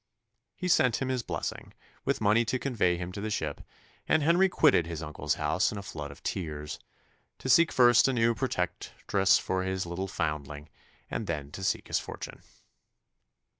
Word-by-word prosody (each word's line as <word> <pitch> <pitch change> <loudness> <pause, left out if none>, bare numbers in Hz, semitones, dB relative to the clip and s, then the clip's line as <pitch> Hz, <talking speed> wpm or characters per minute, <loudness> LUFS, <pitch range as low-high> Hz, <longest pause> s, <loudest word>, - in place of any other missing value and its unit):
He 180 - -4
sent 125 -9 +3
him 130 - -2
his 130 -1 0
blessing, - - -5 0.3
with - - 0
money 110 +3 +4
to 125 +3 0
convey 110 -10 +1
him 90 +1 -5
to 100 - -6
the 110 - -3
ship, 80 -8 -3 0.5
and 155 - +3
Henry 175 +5 +4
quitted 85 - +4
his 80 -2 -5
uncle's 75 -1 -2
house - - +1
in 105 - -6
a 100 - -6
flood 75 -6 -6
of 70 +1 -13
tears, 75 -5 -4 0.6
to - - -7
seek 150 +4 +5
first 120 -1 +6
a 135 - +1
new 115 -1 +3
protectress 95 -3 0
for 95 0 -1
his 95 -1 -2
little 85 +3 -4
foundling, 75 -4 -4 0.4
and - - -3
then 75 -3 -4
to 95 - -7
seek - - -1
his - - +1
fortune. - - -8
95 Hz, 175 wpm, -29 LUFS, 80-120 Hz, 0.6 s, first